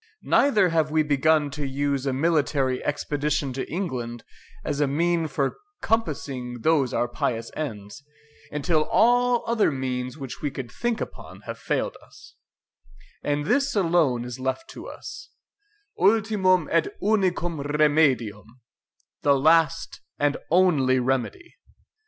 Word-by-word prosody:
Neither 210 -10 +3
have 160 -2 +1
we 155 0 +2
begun 150 0 +2
to 145 +1 -5
use 140 0 -1
a - - +1
military 140 -3 +1
expedition 145 -1 -1
to 130 - -5
England 125 -10 -4 0.4
as 145 - -2
a 145 - +3
mean 165 +3 +1
for 135 -1 -2 0.3
compassing 135 - -2
those 150 -4 +2
our 120 - 0
pious 115 -1 -3
ends, 105 -4 -6 0.5
until 155 +1 +1
all 245 +1 +3
other 230 -6 +2
means 130 -1 -3
which 135 -4 -8
we 145 - -1
could 130 -4 -7
think 240 -2 -2
upon - - -8
have - - -7
failed - - -2
us: - - -17 0.9
and 145 0 -1
this 280 - +1
alone 165 - +2
is 125 +1 -7
left 130 - -3
to - - -9
us, - - -9 0.7
ULTIMUM 195 -4 +3
ET 165 0 +3
UNICUM 185 -6 0
REMEDIUM, 140 -7 +1 0.6
the 140 -1 +4
last 165 +3 +2 0.2
and 145 0 +1
only 155 -8 +3
remedy." 135 - -2
150 Hz, 130 wpm, -25 LUFS, 130-175 Hz, 0.9 s, the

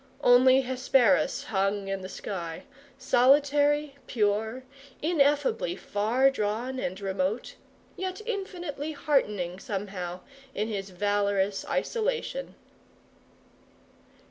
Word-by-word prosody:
Only 255 +2 +6
Hesperus 260 +1 +2
hung 195 -5 -1
in 195 0 -3
the 185 - -7
sky, 170 -6 -6 0.3
solitary, 285 +2 +3
pure, 220 +2 0 0.4
ineffably 290 - +1
far 230 +8 +2
drawn 240 +2 -2
and 185 -4 -3
remote; 195 +3 -2 0.4
yet 375 +1 -4
infinitely 350 -9 -4
heartening, 210 - 0
somehow, 190 -3 -5 0.3
in 215 +2 -1
his 195 -2 -4
valorous 200 0 0
isolation. - - -2
245 Hz, 90 wpm, -28 LUFS, 200-285 Hz, 0.4 s, Only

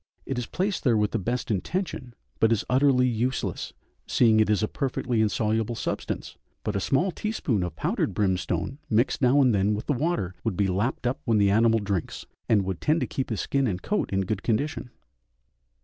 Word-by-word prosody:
It 135 -2 -2
is 120 - -4
placed 190 +2 -2
there 120 -5 +3
with 105 -1 +1
the - - -1
best 120 +5 -2
intention, 125 - -3 0.2
but 115 - +4
is 115 -1 +1
utterly 130 -1 +4
useless, 125 +2 -2 0.4
seeing 110 -3 +4
it 110 - +3
is 105 0 +2
a - - +2
perfectly 125 -3 -1
insoluble 110 +1 0
substance, - - -4 0.3
but 105 - -2
a - - +1
small 145 - +1
teaspoonful 150 - -1
of - - -10
powdered - - -1
brimstone 95 - -1
mixed 120 +6 +1
now 130 +2 +4
and 130 -4 +4
then 100 +1 +2
with 105 - -5
the 145 - +1
water 135 - -1
would 110 -6 -2
be 100 - +2
lapped 105 +8 -1
up 125 +2 0
when 115 -4 +3
the 100 -1 +4
animal 115 +2 +4
drinks, 100 -4 -3 0.2
and 105 -3 +4
would 95 -2 -4
tend 155 +2 +2
to - - +1
keep 135 - -3
his 110 - -2
skin 135 -2 0
and 90 -4 -3
coat 210 - -1
in 95 0 +1
good 95 +1 -2
condition. 125 +3 -1
115 Hz, 200 wpm, -26 LUFS, 105-130 Hz, 0.4 s, but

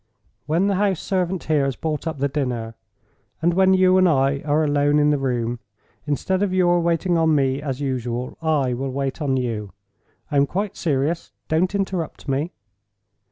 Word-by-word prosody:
When 165 +5 +2
the 200 -2 +1
house 195 -4 +1
servant 185 -2 -1
here 150 -2 +2
has 135 -2 -1
brought 155 +1 -3
up 160 - -3
the 140 +1 +1
dinner, 125 -5 -3 0.7
and 170 +1 +2
when 190 +1 +4
you 185 0 +5
and 185 -1 +5
I 140 -2 +2
are 150 +1 +2
alone 145 0 +2
in 150 0 +4
the 145 - +1
room—instead 125 - -3
of 205 -2 +1
your 175 -1 +3
waiting 170 +1 +1
on 160 -1 +3
me, 135 -1 +1
as 140 -2 -4
usual, 125 -2 -3
I 150 -6 +1
will 135 +2 -3
wait 135 +3 -3
on 135 -3 +1
you. 110 -5 -3 0.6
(I 145 - +1
am 140 0 +4
quite 200 +6 -3
serious; 155 +2 -1 0.2
don't 180 +5 +1
interrupt 190 -7 -3
me!) 140 +5 -1
150 Hz, 175 wpm, -22 LUFS, 135-175 Hz, 0.7 s, you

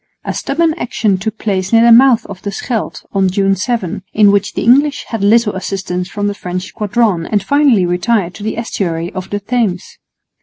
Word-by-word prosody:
A - - -2
stubborn 320 +3 0
action 215 -5 0
took 220 +2 -4
place 190 -4 -2
near 230 0 +5
the 235 - +6
mouth 245 0 +6
of 195 -2 -9
the 200 - -4
Scheldt 225 +2 -4
on 195 -2 +2
June 195 +1 +1
7, 195 -2 -3
in 210 -2 +5
which 200 0 0
the - - -2
English 280 +5 +3
had 225 -4 -3
little 220 +1 +3
assistance 185 -1 -4
from 205 0 -3
the 205 - 0
French 180 -2 -5
squadron 210 -5 0
and 205 -3 0
finally 280 -10 +3
retired 180 +1 0
to 210 - -12
the 215 +1 -3
estuary 175 -7 -3
of 185 0 -6
the 205 - -2
Thames. 210 -4 -2
205 Hz, 195 wpm, -15 LUFS, 185-230 Hz, -, the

